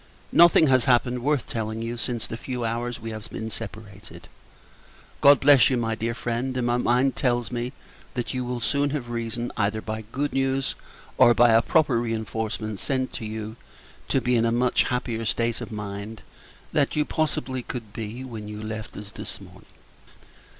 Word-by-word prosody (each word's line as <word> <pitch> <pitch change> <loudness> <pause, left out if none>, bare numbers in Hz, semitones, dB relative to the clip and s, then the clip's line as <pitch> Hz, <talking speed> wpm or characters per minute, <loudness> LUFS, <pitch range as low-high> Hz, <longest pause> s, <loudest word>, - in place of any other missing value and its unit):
Nothing 170 -1 +7
has 130 -4 +4
happened, 125 0 +3
worth 145 0 +1
telling 110 0 -3
you, 115 +1 -3
since 120 -1 -3
the - - -5
few 125 0 -4
hours 120 +1 -2
we 115 0 -6
have 110 0 -8
been 110 0 -5
separated. 105 -2 -9 0.9
God 140 -1 +8
bless 140 -4 +6
you, 130 - +1
my 115 -1 -1
very 110 - -1
dear 115 - -1
friend; 125 +2 -2
and 125 - 0
my 120 0 +2
mind 125 +2 +2
tells 120 -2 0
me, 120 +1 -2 0.4
that 120 +1 -2
you 130 -1 -1
will 125 0 -3
soon 140 +3 +1
have 135 -5 -4
reason, 115 0 -3
either 105 0 +1
by 110 0 -5
good 145 +4 -1
news, 135 0 0 0.5
or 120 - +7
by 120 +1 +6
a 115 +1 +6
proper 145 -4 +3
reinforcement 110 -2 -3
sent 130 -2 -1
to 110 - -5
you, 110 +1 -5 0.5
to - - +2
be 125 0 +1
in 115 - +3
a 115 - +2
much 120 +1 +2
happier 125 -2 -2
state 115 +1 0
of - - -6
mind 105 0 -6 0.5
than 145 -2 +3
you 150 -1 +1
could - - -25
possibly 130 -5 -1 0.3
be 115 +4 -5
when 115 -5 -7
you 105 0 -6
left 110 0 -6
us 105 0 -9
this - - -8
morning. - - -14
120 Hz, 185 wpm, -25 LUFS, 110-130 Hz, 0.9 s, God